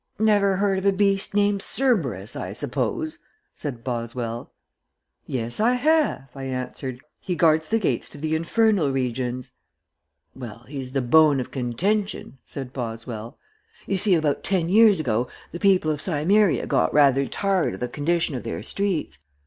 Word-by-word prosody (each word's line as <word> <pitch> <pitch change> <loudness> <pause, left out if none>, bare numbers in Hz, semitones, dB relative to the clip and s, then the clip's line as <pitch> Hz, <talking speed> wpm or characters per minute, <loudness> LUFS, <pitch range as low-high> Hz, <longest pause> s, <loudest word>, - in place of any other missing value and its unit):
"Never 205 -2 +3
heard 195 0 +1
of 190 - -6
a - - +6
beast 195 0 +1
named 205 -1 +2
Cerberus, 140 - 0
I - - -5
suppose?" 315 -2 -2 0.3
said 125 -6 -6
Boswell. 120 -1 -4 0.8
"Yes, 120 - -3
I 230 +3 +4
have," 295 - +2
I 135 -1 -7
answered. 130 0 -5 0.2
"He 180 -2 -3
guards 160 -2 +3
the 225 - +2
gates 155 - -1
to - - -12
the 155 +2 -2
infernal 180 -1 +2
regions." 125 -1 -2 0.8
"Well 120 -2 -9
he's 130 -2 -7
the 135 -2 0
bone 150 +2 +5
of 125 - -5
contention," 165 - -2
said 135 -2 -7
Boswell. 115 -2 -6 0.5
"You 195 -1 0
see, 195 -1 +4
about 155 -3 0
ten 180 -4 0
years 210 -1 +6
ago 120 -5 0 0.2
the 170 - -6
people 185 -5 +3
of 150 -1 -3
Cimmeria 185 +4 +2
got - - +1
rather 140 -2 +4
tired 195 - 0
of - - -11
the 125 - -2
condition 160 +5 -1
of 125 - -3
their 85 +4 -5
streets. 175 - -2
155 Hz, 155 wpm, -24 LUFS, 125-195 Hz, 0.8 s, a